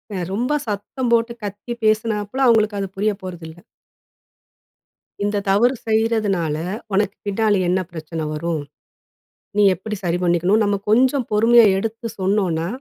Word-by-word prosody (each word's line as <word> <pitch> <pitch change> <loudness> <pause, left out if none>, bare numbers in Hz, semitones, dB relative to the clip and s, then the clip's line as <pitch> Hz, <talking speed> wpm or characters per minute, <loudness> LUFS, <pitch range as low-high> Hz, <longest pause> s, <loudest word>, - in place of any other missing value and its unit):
அ 180 - -2
ரொம்ப 245 +7 0
சத்தம் 235 +4 -3
போட்டு 235 0 +2
கத்தி 205 +4 -5
பேசினாப்பல 215 +3 +1
அவங்களுக்கு 215 -3 +3
அது 195 - -2
புரிய 210 +2 +1
போறதில்லை. 175 -2 -9 1.6
இந்த 205 0 0
தவறு 240 +7 +3
செய்றதுனால, 215 -8 +1 0.4
உனக்கு 200 +1 +1
பின்னாடி 205 -1 +2
என்ன 185 +1 +2
பிரச்சனை 160 -1 -5
வரும்? 160 0 -2 1.0
நீ 205 - +5
எப்படி 210 +4 -6
சரி 175 0 0
பண்ணிக்கணும். 175 +5 +2
நம்ம 205 -1 +1
கொஞ்சம் 255 +3 +3
பொறுமையா 230 +2 +6
எடுத்து 225 +3 -4
சொன்னோம்னா, 185 -4 0
205 Hz, 125 wpm, -21 LUFS, 185-225 Hz, 1.6 s, பொறுமையா